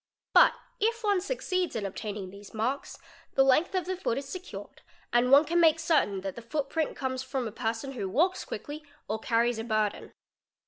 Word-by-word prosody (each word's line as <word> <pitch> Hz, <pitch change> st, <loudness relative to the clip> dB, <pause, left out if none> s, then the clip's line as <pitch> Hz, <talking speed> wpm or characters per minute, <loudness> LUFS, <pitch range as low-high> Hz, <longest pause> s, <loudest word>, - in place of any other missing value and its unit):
But -, -, +8 dB, 0.3 s
if 455 Hz, +2 st, +1 dB
one 405 Hz, -3 st, +2 dB
succeeds 370 Hz, -4 st, -1 dB
in 215 Hz, -3 st, -2 dB
obtaining 200 Hz, -1 st, -5 dB
these 200 Hz, +2 st, -12 dB
marks, 245 Hz, +6 st, -2 dB, 0.4 s
the 270 Hz, -, +6 dB
length 285 Hz, +8 st, +3 dB
of 370 Hz, -, 0 dB
the 375 Hz, +1 st, -2 dB
foot 355 Hz, -10 st, -1 dB
is 275 Hz, 0 st, -4 dB
secured 370 Hz, +5 st, -8 dB, 0.3 s
and 240 Hz, +1 st, +4 dB
one 280 Hz, +3 st, +7 dB
can 340 Hz, +3 st, +1 dB
make 325 Hz, -1 st, +5 dB
certain 300 Hz, -, +2 dB
that 195 Hz, 0 st, -4 dB
the 235 Hz, -, -7 dB
footprint 295 Hz, +5 st, -2 dB
comes 260 Hz, -1 st, -2 dB
from 260 Hz, -2 st, -3 dB
a -, -, -5 dB
person 225 Hz, +4 st, -3 dB
who 205 Hz, -8 st, -4 dB
walks 345 Hz, -, +2 dB
quickly 300 Hz, +1 st, -7 dB, 0.2 s
or 215 Hz, +2 st, -2 dB
"carries 235 Hz, +1 st, +1 dB
a -, -, -3 dB
burden. 215 Hz, -2 st, -1 dB
265 Hz, 190 wpm, -29 LUFS, 225-330 Hz, 0.4 s, But